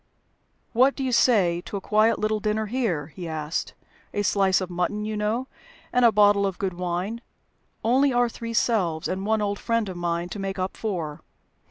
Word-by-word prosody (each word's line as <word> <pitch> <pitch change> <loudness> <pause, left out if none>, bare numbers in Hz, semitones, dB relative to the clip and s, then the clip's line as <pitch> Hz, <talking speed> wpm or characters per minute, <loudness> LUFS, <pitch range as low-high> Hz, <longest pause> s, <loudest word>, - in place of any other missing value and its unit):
"What 260 +4 +4
do 270 - -3
you 260 - 0
say 190 -9 +3
to 200 - -4
a - - -3
quiet 215 +3 +3
little 215 0 0
dinner 215 +1 -1
here?" 210 - -1
he 175 -2 -6
asked. 155 0 -3 0.4
"A 205 - +1
slice 195 -2 +3
of 185 -1 -5
mutton, 180 +4 -1
you 215 0 -3
know, 215 +5 -1 0.5
and 250 0 +3
a 235 - +7
bottle 205 -1 +4
of 190 - -4
good 190 -2 -2
wine. 180 +6 -3 0.6
Only 265 +5 +3
our 245 -1 +3
three 230 0 -6
selves, 180 -10 +1
and 190 +2 -3
one 220 -1 +2
old 205 0 -2
friend 230 -2 0
of 185 - -6
mine 170 0 -2
to 205 - -6
make 195 0 -3
up 185 0 -2
four. 170 -9 -4
205 Hz, 195 wpm, -25 LUFS, 180-225 Hz, 0.6 s, a